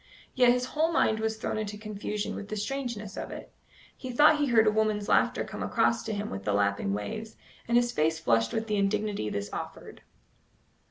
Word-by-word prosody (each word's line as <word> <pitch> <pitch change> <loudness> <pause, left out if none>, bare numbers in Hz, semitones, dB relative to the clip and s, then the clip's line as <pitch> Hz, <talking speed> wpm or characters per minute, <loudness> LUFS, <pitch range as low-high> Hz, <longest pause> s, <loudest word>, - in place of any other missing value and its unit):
Yet 250 -2 +5
his 250 0 +1
whole 320 +2 +2
mind 220 -8 +2
was 220 0 -1
thrown 215 - -2
into 210 -1 -4
confusion 210 0 -4
with 200 - -6
the 215 - -3
strangeness 215 -3 -4
of - - -5
it. - - -9 0.4
He 255 - -7
thought 295 +4 +5
he 290 - +2
heard 230 -3 +5
a 215 - +4
woman's 215 -1 0
laughter - - +3
come - - -7
across - - +1
to 220 - -2
him 205 0 -4
with 95 0 -5
the 105 - 0
lapping 100 -1 +1
waves, 215 - -5 0.3
and 235 0 +3
his 240 0 +2
face 160 -5 +1
flushed 115 -7 +2
with 225 - -1
the 210 -2 -1
indignity 200 - 0
this 100 0 -4
offered. - - -7
215 Hz, 205 wpm, -28 LUFS, 195-235 Hz, 0.4 s, Yet